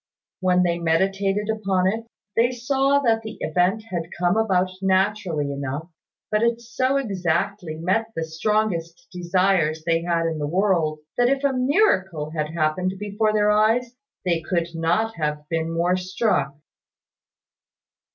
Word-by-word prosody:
When 180 -1 +3
they 170 -1 0
meditated 195 +5 +1
upon 195 -4 0
it, 225 +4 -1 0.3
they 235 +2 +4
saw 270 +3 +1
that 225 -4 +2
the 220 0 -8
event 180 +7 +1
had 170 -2 -3
come 175 +1 +2
about 190 -4 +2
naturally 190 -6 +1
enough; 140 +4 -5 0.4
but 210 0 +2
it 235 0 +2
so 255 +3 0
exactly 185 -6 -1
met 185 +8 0
the 165 - -1
strongest 170 0 -1
desire 180 -2 +2
they 165 -1 +2
had 170 -1 0
in 160 -1 -2
the 145 - -2
world, 165 -3 +1 0.2
that 245 0 +4
if 275 +1 0
a 280 -1 +2
miracle 250 - +1
had 155 -2 -2
happened 165 +3 0
before 210 +2 0
their 210 0 +3
eyes, 225 +4 +2 0.3
they 170 -2 +1
could 170 +1 -1
not 170 +7 0
have 150 -1 -2
been 165 0 -1
more 170 +2 +1
struck. 185 -6 0
185 Hz, 145 wpm, -23 LUFS, 165-215 Hz, 0.4 s, they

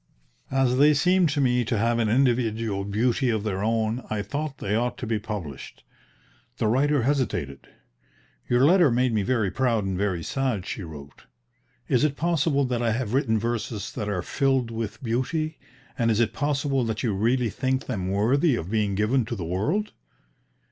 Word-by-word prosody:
As 130 -1 +2
they 150 +1 +6
seemed 180 +3 +3
to 145 0 -1
me 125 -2 +2
to 115 0 -1
have 115 +2 +1
an 110 -2 +1
individual 115 -4 +1
beauty 120 +5 +1
of 110 -3 0
their 100 -2 -2
own, 115 +2 0
I 105 -1 -2
thought 145 +6 -4
they 100 - -3
ought 120 +2 -1
to - - -5
be 110 -1 -1
published. 100 - -7 0.7
The 115 - -1
writer 135 +4 +2
hesitated. 120 - -1 0.8
"Your 125 +2 +4
letter 175 -1 +5
made 125 0 +1
me 110 - +2
very 110 -2 0
proud 115 -3 +1
and 95 -1 -2
very 95 -3 -1
sad," 125 -7 -2
she 100 - -5
wrote. 75 -5 -11 0.6
"Is 125 0 +2
it 145 -2 +1
possible 155 -4 +1
that 125 -2 -1
I 115 -2 +1
have 115 -2 -3
written 120 -5 +2
verses 110 -2 -3
that 105 -4 -3
are 90 -3 -2
'filled 135 -2 0
with 110 +1 -5
beauty,' 150 +7 -2 0.4
and 115 -1 +2
is 110 -1 +2
it 115 -2 +1
possible 140 -2 0
that 110 -1 -3
you 115 -4 +1
really 115 +3 +1
think 130 +3 -1
them 95 -7 -3
worthy 125 - +2
of 90 -3 -5
being 105 -3 0
given 110 +6 +2
to 120 +1 -4
the 90 -6 -5
world? 150 - -1
115 Hz, 180 wpm, -25 LUFS, 105-135 Hz, 0.8 s, they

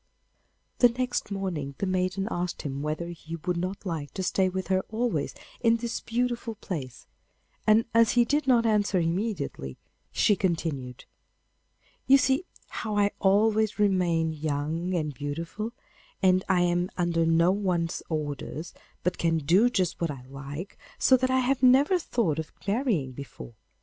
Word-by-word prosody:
The 245 - +7
next 250 -1 -2
morning 175 -9 -3
the - - -1
maiden 185 +1 0
asked 175 0 -3
him 140 -1 -4
whether 155 +3 -3
he 165 -1 -7
would 175 +2 -2
not 185 +4 -4
like 160 -5 -4
to 190 - -2
stay 185 +1 +2
with 190 +1 -4
her 190 0 +3
always 220 -10 -1 0.2
in 230 -1 +4
this 235 0 -3
beautiful 235 -1 -2
place, 150 - -6 0.6
and 215 +1 +5
as 230 0 +5
he 240 -1 +4
did 290 +2 0
not 240 -3 +4
answer 205 -3 +2
immediately, 165 - -2 0.3
she 205 - +3
continued: 160 -9 -2 1.0
'You 275 - +8
see 265 +5 +1 0.2
how 215 -2 -3
I 205 0 +3
always 215 +2 +3
remain 175 -6 +2
young 155 +4 -2
and 150 -3 -1
beautiful, 165 - -4 0.5
and 185 -1 +3
I 185 -2 +4
am 175 +1 +1
under 170 -2 +1
no 165 +2 +4
one's 180 -4 -1
orders, 155 +1 -4 0.3
but 180 +1 -1
can 165 -1 +2
do 175 +10 +4
just 185 -8 -1
what 170 - +1
I 135 -4 -6
like, 140 +7 -8 0.2
so 260 - +5
that 255 0 +1
I 260 0 +3
have 260 +1 +1
never 270 +8 +5
thought 210 - 0
of 160 - -5 0.2
marrying 200 - 0
before. 125 - -9
185 Hz, 155 wpm, -27 LUFS, 160-220 Hz, 1.0 s, You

